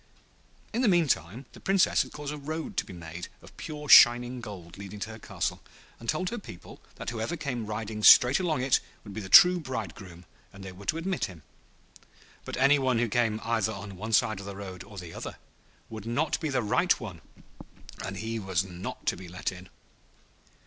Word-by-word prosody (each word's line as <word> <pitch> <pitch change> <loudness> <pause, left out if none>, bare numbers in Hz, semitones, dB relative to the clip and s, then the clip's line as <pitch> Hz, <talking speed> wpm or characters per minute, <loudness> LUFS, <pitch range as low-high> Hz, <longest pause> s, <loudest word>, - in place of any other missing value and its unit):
In 235 - 0
the 250 - +3
meantime, 135 - +1
the - - -13
Princess 195 -1 +3
had - - -5
caused 150 0 -6
a - - -6
road 155 +3 -5
to - - +1
be - - -9
made 85 0 -8 0.2
of - - -15
pure 150 -1 -7
shining 120 -1 +7
gold 90 -6 -9
leading 100 +1 -8
to 110 +4 -4
her 110 - -10
castle, - - -3 0.4
and 115 - -7
told 180 +4 0
her 240 - -4
people 90 - -12
that - - -5
whoever 115 +8 -3
came 125 -8 -4
riding 105 0 -4
straight 125 +4 +8
along 160 -8 0
it 130 -1 +3 0.2
would 105 - -10
be 110 - -5
the 95 - -8
true 180 - +9
bridegroom, 95 - -7 0.3
and 95 0 -12
they 95 - -7
were 95 +2 -13
to 160 - +1
admit 180 +2 -1
him. 85 -5 -11 1.0
But - - -5
any 140 +2 +5
one 130 -3 +1
who 120 +1 +1
came 110 -1 +1
either 110 -2 0
on 100 -1 -8
one 110 +4 -6
side 110 -2 +3
of 100 - -8
the 100 - -6
road 95 -2 -8
or 100 +1 -13
the 90 -3 -8
other - - -7 0.5
would 110 -1 -8
not 145 +7 0
be 160 - -2
the 130 -3 0
right 170 - +2
one, 95 -8 -8 0.8
and 95 0 -5
he 110 +2 -3
was 95 -3 0
not 90 -1 -8
to - - +1
be 90 0 -10
let 90 +2 -3
in. 90 0 -12
110 Hz, 205 wpm, -28 LUFS, 95-140 Hz, 1.0 s, true